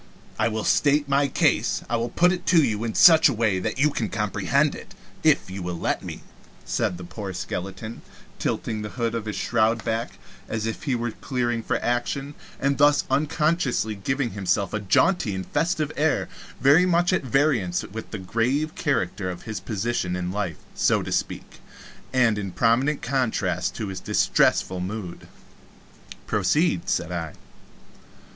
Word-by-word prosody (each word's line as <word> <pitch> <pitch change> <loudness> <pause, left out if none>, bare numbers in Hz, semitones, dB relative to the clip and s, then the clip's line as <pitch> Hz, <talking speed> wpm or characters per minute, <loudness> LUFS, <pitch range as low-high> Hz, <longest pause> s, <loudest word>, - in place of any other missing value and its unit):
I 110 - +3
will 110 -1 -2
state 145 0 +3
my 140 0 +2
case - - +1
I 120 - -1
will 115 +1 -1
put 175 +8 +3
it 180 -1 -4
to 165 -3 +5
you 110 -3 -1
in 115 -2 -3
such 160 -3 +8
a - - 0
way 110 -4 +1
that 110 +6 -3
you 150 +3 +3
can 115 -6 -2
comprehend 105 -3 +1
it, - - -11 0.3
if - - +3
you 95 0 -5
will 90 -1 -4
let - - -1
me," - - -7 0.4
said 90 - -1
the 90 - -9
poor 95 +2 -6
skeleton, 95 +5 -5 0.4
tilting 110 -2 -2
the 105 - -5
hood 115 -2 0
of 115 -2 -3
his 105 - -4
shroud 115 0 +1
back, 115 +1 -2 0.3
as 110 0 -2
if 115 +6 -4
he 135 -4 +1
were 120 -1 -2
clearing 120 -1 -2
for - - -1
action, 130 +4 -1 0.3
and 140 +1 0
thus 145 0 +5
unconsciously 150 -6 +1
giving 125 +5 -2
himself 100 0 -1
a 105 - 0
jaunty 105 - +2
and 95 -1 -4
festive 155 0 0
air 155 +1 +1 0.3
very 155 +7 +5
much 175 +1 +2
at - - +2
variance 130 - +1
with 110 +3 -8
the 105 - -5
grave 125 - -1
character 95 -8 -1
of 90 -1 -7
his 110 -2 -5
position 105 -4 -2
in 90 0 -3
life 95 -5 -3 0.2
so - - +2
to - - -6
speak - - -3 0.5
and 115 -5 +3
in 100 -2 -4
prominent 120 +9 +1
contrast 110 -9 -1
with 105 -3 -3
his 95 -1 -5
distressful 95 -1 +2
mood. 95 -1 -6 1.0
"Proceed," 165 +2 +1
said 85 0 -1
I. 80 -3 -4
115 Hz, 170 wpm, -24 LUFS, 100-140 Hz, 1.0 s, such